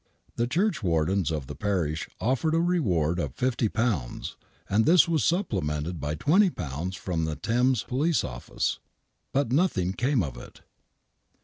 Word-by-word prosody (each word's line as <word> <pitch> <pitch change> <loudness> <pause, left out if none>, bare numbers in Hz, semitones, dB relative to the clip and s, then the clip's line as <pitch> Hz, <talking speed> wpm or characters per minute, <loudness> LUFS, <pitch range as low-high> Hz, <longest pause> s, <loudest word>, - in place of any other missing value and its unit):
The 120 - 0
churchwardens 100 - +1
of 75 -4 -3
the - - -7
parish 85 -7 -1
offered 135 +6 +1
a - - +3
reward 95 - +1
of - - -3
£50, 115 - -1 0.3
and 105 +3 +3
this 170 0 +6
was 160 -6 +1
supplemented 90 - -1
by 75 +2 -2
£20 95 - +1
from 85 -3 -2
the 80 -1 -2
Thames 120 - +1
Police 145 +6 +1
Office, 60 -1 -3 0.5
but 135 -3 0
nothing 125 - +1
came 125 0 +1
of 65 -6 -5
it. - - -12
105 Hz, 135 wpm, -27 LUFS, -, 0.5 s, this